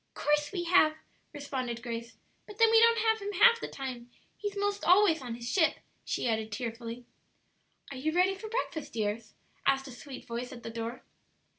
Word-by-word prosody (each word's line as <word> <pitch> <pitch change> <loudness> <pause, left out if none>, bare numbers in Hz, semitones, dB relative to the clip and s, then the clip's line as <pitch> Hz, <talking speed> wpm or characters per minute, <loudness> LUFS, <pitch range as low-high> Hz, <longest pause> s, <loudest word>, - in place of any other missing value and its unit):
"'Course 295 0 +1
we 360 -3 -2
have," 335 -3 +4 0.4
responded 260 -5 -4
Grace; 230 -1 -6 0.3
"but 420 - -11
then 455 -1 +5
we 450 0 +7
don't 465 0 +6
have 445 0 +2
him 410 0 -4
half 465 +5 +6
the - - -4
time; 250 -3 -6 0.3
he's 410 -1 -5
'most 405 0 -1
always 360 -3 +5
on 245 -3 -5
his 235 0 -7
ship," 320 +3 +3 0.3
she - - -2
added 220 -1 -1
tearfully. 230 +1 -5 0.9
"Are 270 - -6
you 305 +5 -1
ready 365 +3 +3
for 430 +3 -8
breakfast, 430 -9 -3
dears?" 215 0 -3 0.3
asked 270 0 +2
a - - -8
sweet 255 +2 -10
voice 240 +1 -5
at 235 -2 -10
the 230 - -6
door. 230 +2 -5
275 Hz, 185 wpm, -30 LUFS, 235-390 Hz, 0.9 s, we